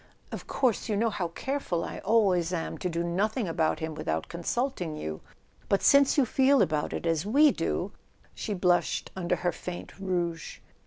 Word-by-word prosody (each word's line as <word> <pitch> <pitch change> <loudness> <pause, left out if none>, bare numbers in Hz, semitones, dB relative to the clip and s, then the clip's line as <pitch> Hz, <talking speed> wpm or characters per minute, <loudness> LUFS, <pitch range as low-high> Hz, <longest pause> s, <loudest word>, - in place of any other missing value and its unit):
"Of - - -7
course 250 -4 0
you 210 - +1
know 225 +1 +1
how 180 -4 -2
careful 180 -2 -3
I - - -6
always 190 -6 +2
am 170 -3 -3
to 180 - -2
do 170 0 -2
nothing 200 +6 0
about 160 -1 +1
him 160 0 -4
without 80 - -3
consulting 175 - -2
you; 80 - -5 0.5
but 200 - +2
since 280 0 +5
you 280 - +5
feel 265 +3 +4
about 150 -1 -1
it - - -4
as 165 -1 +1
we 280 +9 +5
do - - -2 0.2
" - - -37
She 210 - -4
blushed 180 -1 +1
under 180 -1 0
her 175 +1 -1
faint 175 +2 -7
rouge. 175 -4 -2
180 Hz, 180 wpm, -28 LUFS, 170-225 Hz, 0.5 s, since